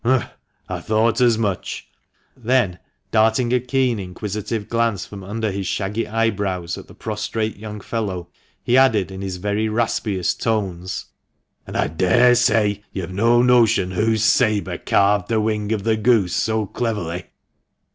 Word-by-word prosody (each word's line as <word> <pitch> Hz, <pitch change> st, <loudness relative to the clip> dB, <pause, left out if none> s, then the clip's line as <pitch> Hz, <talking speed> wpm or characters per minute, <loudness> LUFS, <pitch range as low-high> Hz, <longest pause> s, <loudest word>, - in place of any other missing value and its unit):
" -, -, -43 dB
Humph! 130 Hz, +1 st, +1 dB, 0.4 s
I -, -, -4 dB
thought 110 Hz, +2 st, +1 dB
as 120 Hz, -3 st, +4 dB
much! 105 Hz, -5 st, -3 dB, 0.3 s
" -, -, -45 dB, 0.2 s
Then 120 Hz, -7 st, +1 dB, 0.3 s
darting 115 Hz, +2 st, +3 dB
a 125 Hz, -, +4 dB
keen 125 Hz, -2 st, 0 dB
inquisitive 105 Hz, +3 st, -4 dB
glance 115 Hz, -5 st, 0 dB
from 100 Hz, -2 st, -10 dB
under 110 Hz, +2 st, -2 dB
his 95 Hz, -1 st, -3 dB
shaggy 105 Hz, +5 st, -2 dB
eyebrows 100 Hz, -6 st, -1 dB
at -, -, -10 dB
the -, -, -15 dB
prostrate 110 Hz, 0 st, -3 dB
young 105 Hz, 0 st, -7 dB
fellow, 95 Hz, -6 st, -4 dB, 0.3 s
he 125 Hz, -, +3 dB
added, 110 Hz, -8 st, +3 dB
in 95 Hz, 0 st, -7 dB
his 95 Hz, -2 st, -4 dB
very 105 Hz, +3 st, -1 dB
raspiest 110 Hz, -4 st, -1 dB
tones, 95 Hz, -5 st, -2 dB, 0.6 s
"And -, -, -4 dB
I -, -, +2 dB
daresay 105 Hz, +4 st, +3 dB
you've 95 Hz, -1 st, -5 dB
no 115 Hz, +5 st, +3 dB
notion 115 Hz, -6 st, +4 dB
whose 110 Hz, +3 st, +1 dB
sabre 110 Hz, -2 st, +2 dB
carved 100 Hz, -1 st, +2 dB
the 115 Hz, -1 st, +2 dB
wing 105 Hz, -1 st, -1 dB
of 105 Hz, -3 st, -1 dB
the 110 Hz, 0 st, +1 dB
goose 110 Hz, -5 st, +2 dB
so 110 Hz, -1 st, 0 dB
cleverly 95 Hz, -6 st, -3 dB
110 Hz, 155 wpm, -21 LUFS, 100-115 Hz, 0.6 s, as